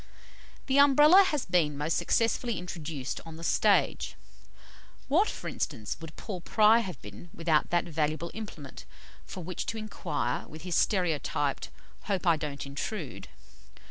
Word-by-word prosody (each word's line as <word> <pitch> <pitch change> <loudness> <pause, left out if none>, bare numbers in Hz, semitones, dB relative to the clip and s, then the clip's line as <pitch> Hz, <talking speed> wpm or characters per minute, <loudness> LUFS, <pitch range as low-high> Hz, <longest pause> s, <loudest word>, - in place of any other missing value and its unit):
'" - - -24
The 270 0 +3
Umbrella 295 +6 +8
has 300 -6 -1
been 165 -5 +1
most 150 +3 -1
successfully 230 +4 +1
introduced 165 -6 -5
on 165 -1 -10
the 165 - -10
stage. - - +2 0.9
What, 350 +10 +3
for - - -7
instance, 105 -2 -3
would 165 0 -9
Paul 190 -5 -6
Pry 215 +5 +5
have 190 -7 -5
been 105 - -11
without 165 -2 +1
that 175 0 +2
valuable 155 +1 -2
implement 165 - -8 0.4
for 185 - -7
which 180 +1 -5
to 225 - -3
inquire 165 - -3
with 155 +1 -11
his 180 -1 -4
stereotyped 160 -7 0 0.4
"Hope 195 -3 -1
I 170 -2 +5
don't 150 -2 -5
intrude?" 145 - -5
170 Hz, 145 wpm, -29 LUFS, 150-215 Hz, 0.9 s, Umbrella